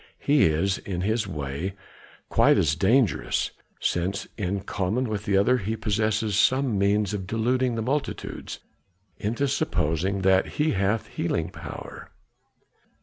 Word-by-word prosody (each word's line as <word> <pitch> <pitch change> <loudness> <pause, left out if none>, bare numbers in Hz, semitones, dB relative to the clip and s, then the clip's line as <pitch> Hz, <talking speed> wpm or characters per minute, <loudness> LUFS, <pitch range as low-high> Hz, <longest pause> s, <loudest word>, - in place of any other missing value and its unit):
He 145 0 +3
is, 90 +5 +1
in 90 -3 -4
his 110 +2 0
way, 75 +3 -4 0.5
quite - - +4
as 75 -2 +3
dangerous, 110 - +2 0.3
since 95 +4 -1
in 100 -1 -2
common 105 +6 -1
with 105 -1 -3
the 100 -3 +2
other 125 +6 +4
he 110 +2 -2
possesses 110 -1 0
some 130 +2 +3
means 100 +1 +2
of 95 -3 -4
deluding 120 +3 +1
the 115 - -2
multitudes 140 +5 -3 0.6
into 115 +7 -1
supposing 90 - 0
that 95 0 +4
he 155 +1 +2
hath 100 +3 0
healing - - -2
power." - - -9
100 Hz, 135 wpm, -25 LUFS, 95-115 Hz, 0.6 s, quite